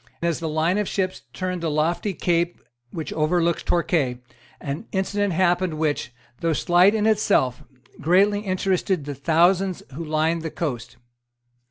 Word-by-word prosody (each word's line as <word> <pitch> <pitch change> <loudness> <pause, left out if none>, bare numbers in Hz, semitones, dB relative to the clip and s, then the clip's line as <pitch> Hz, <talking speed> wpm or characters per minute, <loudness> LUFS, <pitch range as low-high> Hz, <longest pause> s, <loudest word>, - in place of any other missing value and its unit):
As 170 -2 0
the 165 -2 -3
line 160 +5 +1
of 210 - -1
ships 185 -2 -2
turned 185 -1 -3
the 165 - -1
lofty 165 +6 0
cape 170 0 0 0.3
which 160 +4 -5
overlooks 170 +2 +1
Torquay, 155 -7 0 0.4
an 150 +10 -5
incident 200 0 0
happened 175 -1 +1
which, 155 -5 -1 0.3
though 165 -1 +1
slight 180 +6 +4
in 215 -1 +1
itself, 205 - +2 0.4
greatly 195 +6 +3
interested 185 -4 -1
the 145 - -4
thousands 175 +6 +2
who 165 +5 -5
lined 160 +1 0
the 160 - -4
coast. 120 -7 -4
170 Hz, 145 wpm, -23 LUFS, 155-185 Hz, 0.4 s, slight